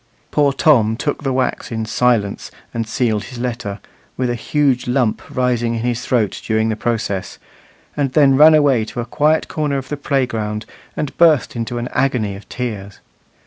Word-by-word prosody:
Poor 145 -2 +3
Tom 115 -7 +3
took 145 +2 -2
the 135 -2 -1
wax 130 -1 -1
in 110 -1 -2
silence 110 -3 0 0.2
and 115 -1 -2
sealed 110 -3 0
his 125 - -9
letter, 120 -4 -4 0.4
with 125 -1 0
a - - 0
huge 130 +1 0
lump 125 -3 +1
rising 120 -2 0
in 115 - -3
his 120 0 -2
throat 115 -6 0
during 110 0 +1
the 110 - 0
process, 110 -4 -2 0.6
and 140 -3 -1
then 140 -3 +5
ran 155 +3 +8
away 140 -6 +3
to 110 - -6
a 120 - -2
quiet 155 +5 +1
corner 150 -3 -1
of 135 - -6
the 150 - -3
playground, 115 -7 -1 0.3
and 150 -3 -3
burst 160 -7 +4
into 120 +1 -3
an 120 +1 -3
agony 125 -6 0
of 100 - -13
tears. 105 -6 -5
125 Hz, 180 wpm, -18 LUFS, 110-135 Hz, 0.6 s, ran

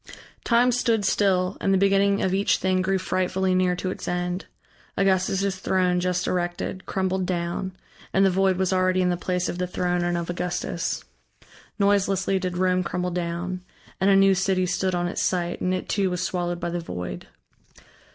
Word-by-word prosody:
Time 245 +1 +4
stood 230 -4 +1
still, 185 -1 +2
and 195 - +1
the 195 - +4
beginning 200 +1 +3
of 185 - +1
each 195 +1 +2
thing 185 0 +1
grew 190 +1 +1
frightfully 185 0 0
near 185 -1 +2
to 185 +1 -3
its - - -7
end. 180 +1 -2 0.5
Augustus' 195 0 +1
throne 185 -1 +1
just 180 0 0
erected, 175 +1 -3
crumbled 190 -1 -1
down, 175 +1 -2 0.4
and 195 +1 +4
the 190 - +4
void 190 0 +2
was 190 0 +1
already 185 0 +2
in 180 - +2
the - - +1
place 180 0 -1
of 175 - -4
the 180 - -1
throne 180 0 -1
and 175 0 0
of 170 -1 -3
Augustus. 175 0 -3 0.7
Noiselessly 195 -2 +2
did 180 -1 -3
Rome 185 0 +2
crumble 180 0 -2
down, 175 +1 -3 0.4
and 190 - +3
a 195 - +6
new 195 0 +6
city 190 0 +1
stood 185 +1 0
on 175 0 0
its 175 - -3
site 175 -1 -1
and 180 - 0
it 185 0 -2
too 195 -3 +1
was 180 0 -2
swallowed 175 -3 -2
by 170 0 -3
the 175 - -2
void. 90 - -6
185 Hz, 185 wpm, -25 LUFS, 180-190 Hz, 0.7 s, a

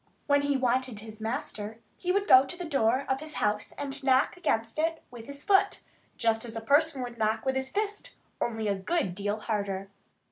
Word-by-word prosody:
When 285 0 +4
he 285 -1 +1
wanted 255 -3 0
his 220 0 -11
master 220 -1 -4 0.2
he 360 - -1
would 400 +2 +1
go 260 +1 +9
to 275 +5 -8
the 355 - -5
door 265 -3 +2
of 265 0 0
his 310 +1 -7
house 210 0 0
and 285 0 -5
knock 265 0 +3
against 230 -8 -1
it 325 +1 0
with 230 -2 -10
his 280 +1 -8
foot, 400 0 +3 0.3
just 225 -1 +2
as 230 -2 -7
a 225 - -3
person 285 +2 +3
would 240 -1 -7
knock 220 +1 +1
with 265 0 +1
his 265 0 -1
fist, 415 0 -3 0.3
only 225 -2 -1
a 200 - +2
good 195 - -1
deal 205 +3 -2
harder. 200 -3 -2
255 Hz, 205 wpm, -29 LUFS, 220-285 Hz, 0.3 s, go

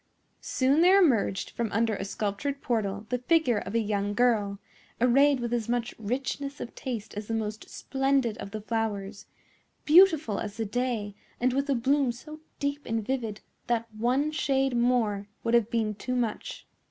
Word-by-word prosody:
Soon 275 +4 +2
there 370 +3 +7
emerged 230 - +2
from 230 -3 -3
under 225 +1 +1
a 195 - -4
sculptured 210 +8 -3
portal 210 -5 -2
the 250 -1 0
figure 250 -4 +2
of 195 +3 -6
a - - +4
young 205 -1 -1
girl, 215 -4 +2 0.4
arrayed 270 +3 +4
with 240 -1 -3
as 235 -2 -1
much 240 -1 -1
richness 270 +5 -3
of 235 - -6
taste 225 -4 -5
as 210 0 -6
the 225 - -1
most 215 -1 -4
splendid 270 -4 0
of - - -6
the 215 +1 -6
flowers, 210 -2 -3 0.6
beautiful 320 - +5
as 210 0 -5
the 225 - -1
day, 225 -2 -2 0.3
and 250 +1 +2
with 275 +2 -1
a 275 - +3
bloom 270 +2 +2
so 305 +6 -10 0.2
deep 285 +1 -2
and 225 -2 -1
vivid 230 -5 -3 0.3
that 230 -1 -1
one 255 +7 +1
shade 270 -4 +1
more 235 -5 +1 0.2
would 230 - 0
have 235 -2 +4
been 220 -3 0
too 250 +5 -4
much. 245 - -3
235 Hz, 175 wpm, -28 LUFS, 215-270 Hz, 0.6 s, there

